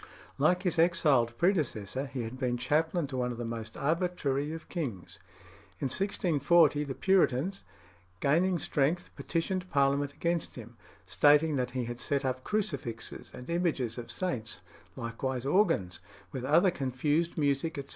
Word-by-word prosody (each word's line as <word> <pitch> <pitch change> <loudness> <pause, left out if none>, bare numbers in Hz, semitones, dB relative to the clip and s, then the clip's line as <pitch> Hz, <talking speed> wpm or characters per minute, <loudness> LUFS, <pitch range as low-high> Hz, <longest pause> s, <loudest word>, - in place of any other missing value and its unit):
Like 180 +6 +3
his 180 -3 0
expelled 145 -9 +3
predecessor, 140 - 0
he 130 -2 -4
had 115 +3 -7
been 125 -2 0
chaplain 160 +6 +1
to 135 -2 -5
one 125 -1 0
of 120 - -6
the 120 - -4
most 115 -1 -6
arbitrary 155 -3 0
of 160 0 -7
kings. 125 - -4 0.6
In 135 - -1
1640 165 -3 +3
the 135 -2 -5
Puritans, 190 -1 +2 0.6
gaining 170 - +2
strength, 155 +3 0
petitioned 185 +2 -2
Parliament 140 0 +2
against 170 +1 -2
him, 120 -1 -10 0.3
stating 150 +1 +4
that 125 -1 -1
he 125 - -1
had 120 +1 -6
set 140 -1 0
up 130 0 -2
crucifixes 145 - -3
and 125 - -10
images 155 -9 -1
of 120 - -8
saints, 120 - -3 0.3
likewise 125 +2 -3
organs, 135 - +2 0.3
"with 130 -1 -4
other 170 +7 +5
confused 145 +5 -1
music, 145 +2 0
etc. 140 -1 -6
140 Hz, 145 wpm, -30 LUFS, 125-170 Hz, 0.6 s, other